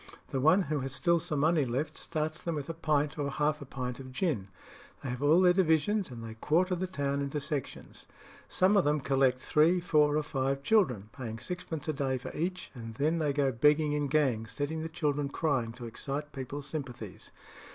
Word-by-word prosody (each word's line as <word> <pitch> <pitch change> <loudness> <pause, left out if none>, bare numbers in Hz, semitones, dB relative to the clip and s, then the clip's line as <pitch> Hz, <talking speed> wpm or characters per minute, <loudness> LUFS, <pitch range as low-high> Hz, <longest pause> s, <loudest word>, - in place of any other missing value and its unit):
The 135 - -1
one 180 +7 +5
who 150 -2 -1
has 135 0 -4
still 170 +2 +2
some 155 -4 -2
money 160 0 +3
left 130 +5 -2
starts 155 0 -3
them 170 -2 -2
with 145 +1 -4
a - - -2
pint 150 -2 0
or 140 -1 0
half 150 +1 0
a - - -6
pint 125 -1 -4
of 130 -1 -9
gin. 130 - -1 0.6
They 135 - -3
have 125 +1 -4
all 155 +5 +5
their 180 -1 +6
divisions, 185 +2 +2
and 120 -2 -8
they 115 0 -6
quarter 170 +11 +1
the 185 +1 -1
town 140 -5 -1
into 140 +1 -2
sections. 145 -1 -5 0.4
Some 190 +3 +3
of 200 - +5
them 150 +1 +2
collect 135 -2 +2
three, 155 +7 +3
four, 150 -4 +3
or 155 - +1
five 135 -1 -1
children, 130 - +2
paying 115 -4 -6
sixpence 160 +4 -5
a 155 - 0
day 135 -2 -1
for 125 - -8
each, 180 +3 -3
and 115 -3 -8
then 155 +6 +1
they 150 -2 +1
go 140 -1 +1
begging 150 +5 +3
in 145 -1 0
gangs, 130 -7 +1
setting 155 +2 -2
the 160 - -4
children 145 -2 -1
crying 140 -7 0
to 120 0 -8
excite 140 +6 -5
people's 135 +1 -5
sympathies. 125 - -6
145 Hz, 205 wpm, -30 LUFS, 135-160 Hz, 0.6 s, their